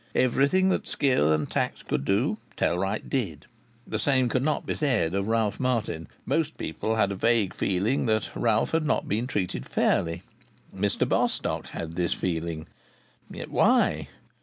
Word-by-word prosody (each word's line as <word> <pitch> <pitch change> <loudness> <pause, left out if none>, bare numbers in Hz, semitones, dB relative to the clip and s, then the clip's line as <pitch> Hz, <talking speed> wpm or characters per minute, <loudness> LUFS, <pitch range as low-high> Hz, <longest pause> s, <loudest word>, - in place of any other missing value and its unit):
Everything 140 +9 +3
that - - 0
skill 125 - +2
and 75 -1 +1
tact - - -2
could 70 - -1
do 125 - +1 0.2
Tellwright 95 +4 0
did. 95 - -2 0.4
The - - -3
same 130 -3 +2
could 130 - +1
not 150 +2 0
be - - -1
said 120 - +1
of 100 +1 -1
Ralph 110 -3 +1
Martin. 115 -10 -1 0.2
Most 160 -1 0
people 110 +8 -2
had 100 -3 +2
a - - -2
vague 115 -1 +2
feeling 100 +8 0
that 110 -1 0
Ralph 110 -2 +1
had 165 0 +2
not - - +1
been 110 +5 -1
treated 90 - -2
fairly. 85 +6 0 0.5
Mr 100 +1 0
Bostock - - 0
had 80 0 -6
this 85 -2 +1
feeling. 80 -3 -3 0.6
Yet - - -7
why? - - +3
105 Hz, 160 wpm, -27 LUFS, 90-130 Hz, 0.6 s, Everything